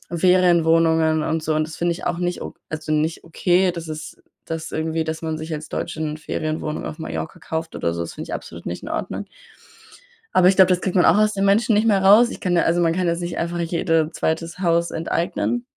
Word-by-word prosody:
Ferienwohnungen 165 -3 +3
und 160 +1 -1
so 155 0 0
und 155 0 0
das 155 - -9
finde 175 0 +1
ich 170 - -8
auch 175 - -1
nicht 175 0 -2
o - - -7 0.2
also, 155 0 -4
nicht 155 +2 0
okay, 180 +2 +2
dass 170 -1 -7
ist 155 0 -8 0.2
das 160 0 -5
irgendwie, 160 0 -1
dass 160 0 -4
man 160 -1 -2
sich 160 +1 -6
als 155 0 -5
Deutsche - - -4
'ne 155 -1 -3
Ferienwohnung 155 0 -3
auf 155 - -7
Mallorca 80 - -5
kauft 160 0 -5
oder 85 - -1
so, 85 - -3
das 85 - -5
finde 155 - -7
ich - - -4
absolut - - -9
nicht - - -5
in - - -7
Ordnung. - - -4 1.1
Aber 180 -1 +5
ich 195 - +3
glaube, 190 -1 +7
das 180 0 +2
kriegt 190 - -2
man 180 - +5
auch 175 - +5
aus 215 0 +3
den 195 0 0
Menschen 215 +3 +3
nicht 215 +2 +3
mehr 200 -3 +3
raus. 215 +5 +7
Ich - - -8
kann 180 -3 0
da 170 - +4
also, 170 +1 +2
man 165 -1 +2
kann 180 0 0
jetzt 170 +1 0
nicht 175 0 -4
einfach 170 +1 -2
jede 165 -2 0
2. 165 +2 -2
Haus 170 -2 +1
enteignen. 170 +8 -1
165 Hz, 235 wpm, -22 LUFS, 160-180 Hz, 1.1 s, glaube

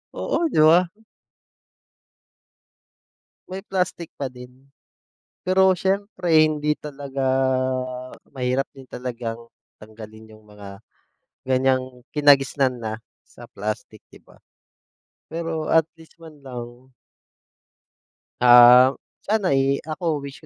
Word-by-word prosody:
Oo, 335 - -1
'di - - +1
ba? 175 +2 +5 2.6
May 190 +1 -7
plastik 180 -4 -3
pa 140 - -2
din. 125 +1 -14 0.8
Pero 190 0 +3
siyempre 190 -3 +1
hindi 150 -1 +1
talaga, 140 -2 -7 1.1
mahirap 130 +1 -1
din 135 -2 -15
talagang 120 -2 -6 0.4
tanggalin 110 0 -13
'yong 110 - -16
mga, 105 -2 -13 0.7
ganyang 130 -1 0
kinagisnan 140 -3 +3
na, 110 -1 -3 0.3
sa - - -15
plastik, 105 +1 -6
'di - - -16
ba. - - -22 0.9
Pero, 165 -1 -4
at 160 -1 +4 0.2
least, 160 - -18
man 160 -3 -15
lang 125 0 -10 1.5
Ah, 125 +1 +8 0.3
sana, 205 -2 0
eh, 135 +1 +1
ako 155 -1 -3
wish 140 -1 -10
135 Hz, 100 wpm, -22 LUFS, 125-160 Hz, 2.6 s, Ah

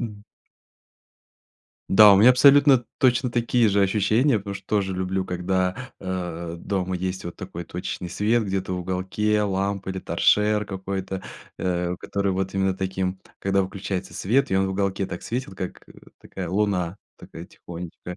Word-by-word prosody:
м. 105 -3 -6 1.6
Да. 105 +1 +8
У - - +5
меня 110 +6 +8
абсолютно 140 0 +6
точно 125 -1 +3
такие 120 -1 +2
же 100 0 +3
ощущения, 110 +6 +2
потому 100 0 -6
что 100 -1 -10
тоже 100 -3 0
люблю, 95 +1 -1
когда, 90 +1 -1 0.2
а, 85 -3 -4
дома 95 0 -2
есть 95 0 -4
вот 85 - -6
такой 90 -2 -7
точечный 90 +1 -5
свет 110 +6 +1
где-то 95 -1 -2
в 90 - -2
уголке. 95 +4 0
Лампа 100 -1 -1
или 95 - -4
торшер 105 +2 +2
какой-то, 95 -1 -5 0.4
э, 90 -1 -1
который 100 -1 -1
вот 95 +1 -2
именно 95 -1 +1
таким, 95 0 -3 0.2
когда 100 0 +1
выключается 95 0 -5
свет 130 +8 +1
и 95 - +2
он 95 - +2
в - - -3
уголке 95 0 -1
так 90 - -7
светит, 115 0 -4
как, 90 - -6
э, - - -14 0.3
такая - - -7
луна, 95 -3 0 0.2
такая 80 - -10
тихонечко. 90 +1 -9
95 Hz, 160 wpm, -24 LUFS, 95-105 Hz, 1.6 s, Да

